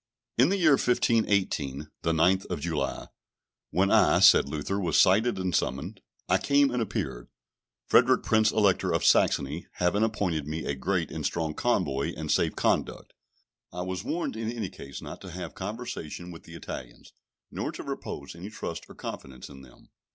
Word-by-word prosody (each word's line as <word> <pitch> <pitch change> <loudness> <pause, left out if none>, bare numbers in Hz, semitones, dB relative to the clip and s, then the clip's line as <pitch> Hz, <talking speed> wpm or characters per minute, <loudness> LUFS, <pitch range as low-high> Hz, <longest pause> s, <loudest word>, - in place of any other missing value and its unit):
In 125 +6 +5
the 200 - +1
year 165 -5 +4
1518, 95 - +1
the 80 - +1
9th 90 +4 +2
of - - -3
July, - - -3 0.6
when 95 +4 +2
I, 105 -5 +5
said 95 -7 +7
Luther, 80 +7 -2
was 85 -5 +2
cited 100 +3 +4
and 95 -3 -1
summoned, 65 +2 -2 0.3
I - - +3
came 140 -1 +3
and 125 -1 -1
appeared: - - -3 0.6
Frederick 125 +1 +4
Prince 110 -1 +3
Elector 100 -4 +2
of - - 0
Saxony 75 +5 +2
having 90 +4 +1
appointed 95 -9 0
me 80 +1 -4
a 70 - -1
great 85 +4 -1
and - - -5
strong 80 -2 -1
convoy 70 -2 0
and 75 -1 -3
safe - - +2
conduct. - - -1 0.6
I 90 +1 -4
was 95 +1 -4
warned 170 -4 -2
in 110 0 -3
any 115 -6 -4
case 70 -7 -9
not - - -8
to 95 - -9
have 90 -1 -7
conversation 95 -5 -6
with 85 - -12
the 85 - -11
Italians, 65 -6 -9 0.4
nor - - -3
to - - -8
repose 70 - -6
any 85 +4 -8
trust 85 -5 -6
or - - -12
confidence 65 -1 -8
in 70 -1 -12
them. 65 -2 -18
90 Hz, 175 wpm, -27 LUFS, 75-110 Hz, 0.6 s, said